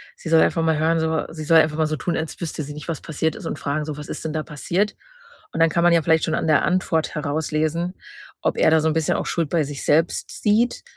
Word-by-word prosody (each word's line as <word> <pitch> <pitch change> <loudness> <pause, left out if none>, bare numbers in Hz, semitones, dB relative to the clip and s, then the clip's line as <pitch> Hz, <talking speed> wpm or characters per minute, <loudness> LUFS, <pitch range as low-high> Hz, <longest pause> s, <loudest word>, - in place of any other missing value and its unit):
sie 165 - -8
soll 160 0 +6
einfach 165 - +2
mal 160 -1 +2
hören 165 +1 +2
so 160 0 0
sie 155 -1 -7
soll 160 +2 +6
einfach 155 -1 +1
mal 160 - +2
so 155 - -2
tun, 170 +3 -2
als 160 0 -5
wüsste 160 -2 -3
sie 145 +1 -7
nicht, 150 +2 -9
was 165 -3 -4
passiert 160 0 -2
ist - - -9
und - - -4
fragen 145 +2 -2
so: 155 -1 -5
„Was 150 - -8
ist - - -6
denn 155 - -3
da 155 -1 -2
passiert?“. 175 +7 -2 0.6
Und - - -3
dann 165 - +5
kann 170 +2 0
man 175 0 +5
ja 170 - +4
vielleicht 160 +1 +2
schon 160 - -2
an - - -1
der 155 -3 +4
Antwort 180 -3 0
herauslesen, 155 +3 -1 0.5
ob - - 0
er - - +4
da 160 0 +4
so 160 - +1
'n - - 0
bisschen 160 -1 +1
auch - - -2
Schuld 165 -4 -1
bei 165 -3 +1
sich 145 -1 -6
selbst 160 +3 +1
sieht 220 +4 +2
160 Hz, 275 wpm, -22 LUFS, 155-165 Hz, 0.6 s, soll